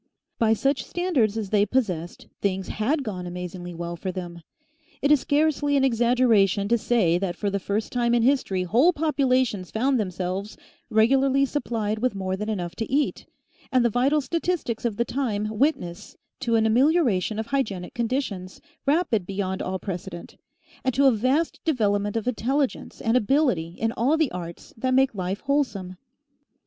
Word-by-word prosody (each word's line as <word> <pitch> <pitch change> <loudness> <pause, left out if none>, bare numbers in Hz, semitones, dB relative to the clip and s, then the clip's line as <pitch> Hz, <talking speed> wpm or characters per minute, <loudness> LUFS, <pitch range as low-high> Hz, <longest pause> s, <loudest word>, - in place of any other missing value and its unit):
By 225 -1 +4
such 275 +5 0
standards 280 - 0
as 210 -4 -4
they 205 -1 +4
possessed, 195 -7 -2 0.2
things 190 -1 -1
HAD 275 +8 0
gone 185 -6 -5
amazingly 175 0 -6
well 170 +1 -4
for 185 +3 -4
them. 175 -2 -7 0.6
It 285 - +2
is 300 - +6
scarcely 290 0 +1
an 270 - +2
exaggeration 230 -5 +3
to 235 - +4
say 190 -8 +2
that 180 -2 -2
for 200 +2 -2
the 200 - -1
first 205 +3 -2
time 240 -1 +1
in 235 - +2
history 240 -8 +1
whole 245 - +4
populations 260 - +1
found 260 +3 +1
themselves 185 +1 -3 0.3
regularly 270 +5 +3
supplied 225 -6 -2
with 250 -2 0
more 190 -1 -2
than 210 +3 -4
enough 180 -5 -3
to 225 - -4
eat, 285 +2 0 0.4
and 255 -3 +3
the 235 - +2
vital 275 +6 +2
statistics 330 -7 -2
of 220 -4 -1
the 235 - +1
time 225 -7 -1
witness 210 - -1 0.2
to 235 -3 0
an 220 -1 +3
amelioration 235 - +2
of 220 - -2
hygienic 215 -8 -2
conditions 230 -7 -3 0.3
rapid 280 - +1
beyond 190 -1 -2
all 190 +1 -2
precedent, 175 -3 -7 0.5
and 260 -2 0
to 275 +2 +4
a 270 - +7
vast 260 +9 0
development 205 -7 +1
of 225 - -3
intelligence 260 +3 -1
and 225 +1 +1
ability 235 - +1
in 225 0 0
all 255 +7 +1
the 315 -4 +1
arts 170 -1 -8
that 255 +3 0
make 265 -1 +3
life 190 0 -3
wholesome. 225 -11 -1
225 Hz, 165 wpm, -25 LUFS, 190-270 Hz, 0.6 s, a